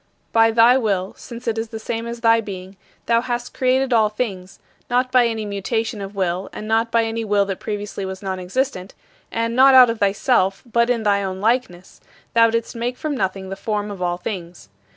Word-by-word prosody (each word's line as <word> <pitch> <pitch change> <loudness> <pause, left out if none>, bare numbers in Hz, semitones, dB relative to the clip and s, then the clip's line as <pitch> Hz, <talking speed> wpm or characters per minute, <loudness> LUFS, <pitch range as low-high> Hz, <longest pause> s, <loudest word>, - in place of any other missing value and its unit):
By 225 0 +5
thy 235 +3 +5
will, 195 -5 -1
since 235 0 -10
it 225 -1 0
is 225 - -3
the 220 0 -7
same 225 +1 -4
as 235 0 -6
thy 230 -1 +4
being, 190 -2 -8 0.3
thou 230 0 +3
hast 245 0 -4
created 260 0 +1
all 220 -2 +4
things, 195 -5 -5 0.3
not 250 +1 +1
by 250 -2 +5
any 220 -2 -3
mutation 210 +2 -2
of 195 +1 -7
will 185 0 -1
and 215 - -7
not 225 +1 +1
by 230 0 +3
any 225 0 -2
will 205 -2 +2
that 195 -2 -4
previously 205 -1 -5
was 190 +1 -6
nonexistent 190 +3 -3 0.4
and 230 0 -1
not 265 +1 +7
out 250 -2 +8
of 230 - -6
thyself, 195 -1 +1
but 235 0 +1
in 235 -2 +1
thy 200 -1 +2
own 190 -1 -4
likeness, 210 -5 -2 0.3
thou 230 0 +5
didst 230 +1 -2
make 240 +2 -3
from 305 -2 -3
nothing 190 -3 -3
the 195 - -4
form 210 0 -3
of 195 -2 -8
all 175 -1 0
things. 175 - -7
220 Hz, 205 wpm, -21 LUFS, 195-235 Hz, 0.4 s, out